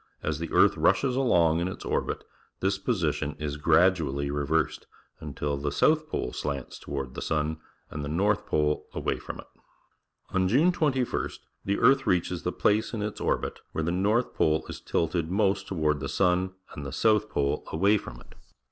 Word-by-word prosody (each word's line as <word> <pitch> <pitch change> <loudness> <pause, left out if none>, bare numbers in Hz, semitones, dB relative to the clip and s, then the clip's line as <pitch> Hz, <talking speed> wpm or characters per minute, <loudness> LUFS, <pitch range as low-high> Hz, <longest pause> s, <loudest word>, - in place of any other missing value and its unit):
As 75 -1 -1
the 85 - -5
earth - - +5
rushes 130 -2 +2
along 85 -11 +3
in 85 - 0
its 95 - -7
orbit, - - -1 0.4
this 95 +1 0
position 80 -8 -1
is 75 -1 -4
gradually 75 -4 +2
reversed, 75 +2 -1 0.3
until 75 -1 -3
the 70 +1 -2
south 155 - +2
pole 60 - -3
slants 70 -2 -4
toward 70 -2 -5
the - - -6
sun 80 0 -1 0.3
and 75 - -5
the 70 - -4
north 100 +6 +1
pole 75 0 0
away - - -1
from - - -7
it. - - -10 0.9
On 95 0 +2
June 145 - +4
21st 135 -7 -1 0.2
the 100 - +1
ear 135 - +6
th 135 -1 -6
reaches 90 -1 +1
the - - -1
p - - +2
lace 110 +3 0
in 105 - -2
its 105 - -4
orbit - - -1
where 80 - -1
the 85 - 0
north 105 +7 +1
pole 80 0 +1
is - - -7
tilted 85 0 -1
most 100 +1 +1
toward 75 -5 0
the - - -4
sun 95 0 +1 0.2
and 75 - -7
th 70 - -5
e - - -6
south 110 -1 +3
pole 70 0 0
away 100 +6 +3
from - - -10
it. - - -17
85 Hz, 190 wpm, -27 LUFS, 75-105 Hz, 0.9 s, ear